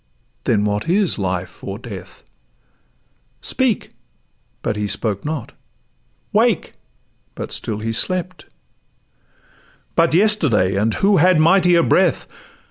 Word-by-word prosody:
then 105 -3 +2
what 105 +6 -2
is 190 - +1
life 90 -2 -4
or 100 0 -5
death? 110 -5 -10 1.2
Speak!' 255 -5 -1 0.7
but - - -1
he 105 0 -2
spoke 100 -1 -2
not: 150 -4 -4 0.8
'Wake!' - - +2 0.6
but - - -6
still 105 - -3
he 115 +1 -2
slept:— 185 +4 -1 1.5
'But 165 -1 +3
yesterday 155 - +2
and 105 +2 +1
who 200 0 +3
had 175 0 +4
mightier 175 +1 +4
breath? 180 0 +2
150 Hz, 110 wpm, -19 LUFS, -, 1.5 s, had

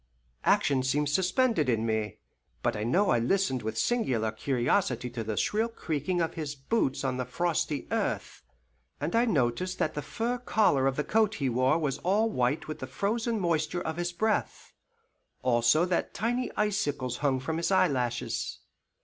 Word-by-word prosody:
Action 135 -2 +3
seemed 140 +3 +1
suspended 185 - +2
in 115 -2 +1
me, 110 -2 -1 0.5
but - - +1
I 105 - -3
know 185 - +2
I 120 - +3
listened 130 0 +1
with 110 0 -4
singular 125 - +1
curiosity 125 - 0
to 115 - -4
the 110 -1 -3
shrill 220 +2 +1
creaking 175 - -2
of 165 0 -1
his 150 -3 -4
boots 135 - -1
on 130 -1 -1
the 130 - -1
frosty 155 +1 -1
earth, - - -2 0.6
and 150 - -2
I 235 +1 +4
noticed 175 - 0
that 155 - 0
the 150 - -3
fur 240 +9 -2
collar 205 - +2
of 135 - 0
the 150 - 0
coat 220 +2 +2
he 135 -3 -1
wore 130 +5 +2
was 150 -5 -1
all 210 +5 +2
white 125 +1 0
with 155 - -5
the 130 - -5
frozen 225 - -1
moisture 170 -1 0
of 160 +1 -3
his 175 0 -1
breath, 215 +5 -1 0.7
also 120 +6 +4
that 180 -1 -1
tiny 240 +3 -1
icicles 145 - 0
hung 135 -3 +1
from 160 +5 -3
his 170 - 0
eyelashes. 135 -11 0
150 Hz, 170 wpm, -29 LUFS, 130-195 Hz, 0.7 s, I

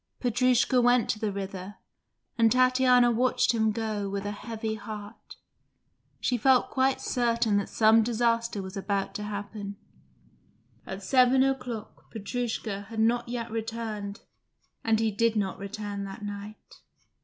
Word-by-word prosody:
Petrushka 250 +1 +3
went 245 -1 +4
to 215 - -5
the 215 -2 -1
river, 195 0 -6 0.6
and 230 -3 +4
Tatiana 255 -1 +5
watched 245 +1 +2
him 220 -1 +2
go 215 -2 -2
with 200 0 -4
a 205 - -2
heavy 220 +1 -4
heart. 210 0 -9 0.8
She 250 - 0
felt 260 +2 +4
quite 265 0 +2
certain 230 -4 +1
some 220 +1 +5
disaster 230 -2 0
was 190 +1 -8
about 195 0 -2
to - - -5
happen. 205 0 -5 1.1
At 190 +1 -6
seven 255 +4 +4
o'clock 250 -5 -4
Petrushka 220 -2 -4
had 225 -1 -5
not 235 +2 +2
yet 235 -1 -4
returned, 225 -2 -4 0.6
and 225 -1 +2
he 225 -1 +1
did 230 +2 +1
not 195 -3 -1
return 200 0 -5
that 195 +2 -8
night. 205 +1 -9
220 Hz, 135 wpm, -28 LUFS, 205-240 Hz, 1.1 s, Tatiana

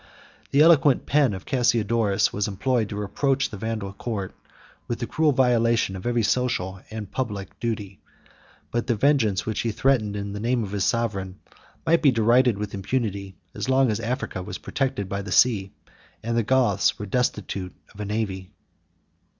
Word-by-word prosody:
The 140 - +4
eloquent 150 -5 +5
pen 145 -5 +3
of 95 - -9
Cassiodorus 115 -5 +1
was 100 0 -1
employed 110 +2 0
to - - -5
reproach 135 +7 0
the 105 - -6
Vandal 110 -2 -4
court 100 -3 -4 0.5
with 120 - -2
the 120 - -3
cruel 155 +4 +2
violation 115 -6 +2
of 95 +4 -5
every 120 -1 +1
social 95 -6 0
and 110 -2 -7
public 105 -7 -4
duty; 105 -5 -4 0.7
but 120 0 -1
the 120 - +2
vengeance 110 -6 +2
which 110 -1 -2
he 115 - 0
threatened 110 -3 +1
in 100 0 -4
the 105 - -5
name 120 +2 0
of 100 - -6
his 100 -2 0
sovereign 100 -5 -1 0.5
might 165 +1 +3
be 145 - +6
derided 120 -1 +3
with 105 -1 -5
impunity, 100 -2 -3 0.2
as - - -4
long 130 -2 +4
as 105 - -2
Africa 120 -4 -3
was 95 0 -6
protected 130 -6 -2
by 100 +1 -3
the 100 -2 -7
sea, 100 -2 +3 0.5
and 115 +1 -1
the 115 - +3
Goths 115 -4 +2
were 105 - -5
destitute 100 -4 -2 0.2
of 105 - -16
a 105 - -3
navy. 100 -3 -3
110 Hz, 175 wpm, -24 LUFS, 100-125 Hz, 0.7 s, be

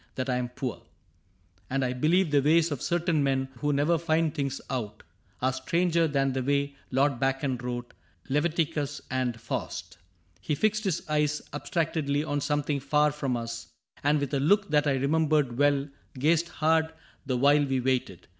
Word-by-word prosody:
That 130 0 -2
I 125 - +1
am 125 -1 -2
poor; 125 -1 -5 0.4
— 90 0 -37
and 135 0 0
I 125 - -1
believe 160 +6 +2
the 145 -1 +4
ways 160 +3 +3
Of 145 - -3
certain 170 -2 +1
men 135 -1 0
who 145 +3 0
never 150 +4 +2
find 160 -2 +1
things 140 -1 -2
out 110 -5 -4 0.4
Are 130 0 +2
stranger 170 +5 +1
than 135 -2 +1
the 130 - -1
way 140 +1 0
Lord 135 -1 +1
Bacon 135 0 0
wrote 120 0 -5 0.3
Leviticm^ 150 -1 0
and 125 -3 -1
Faust 85 -6 -5 0.4
He 150 - -2
fixed 215 +5 +1
his 190 -5 -1
eyes 150 -1 0
Abstractedly 145 -1 -1
on 145 -2 -2
something 145 0 0
far 150 +2 +2
from 135 -4 -2
us, 115 0 -6 0.4
And 145 +1 +3
with 140 -1 -3
a 140 - +2
look 200 +8 +2
that 150 0 +3
I 140 - +3
remembered 145 -2 +1
well 145 -1 +3 0.3
Gazed 160 +5 +2
hard 160 +1 +1 0.4
the 130 -2 0
while 145 +3 +5
we 135 -2 0
waited. 125 -8 -1
140 Hz, 175 wpm, -28 LUFS, 130-155 Hz, 0.4 s, while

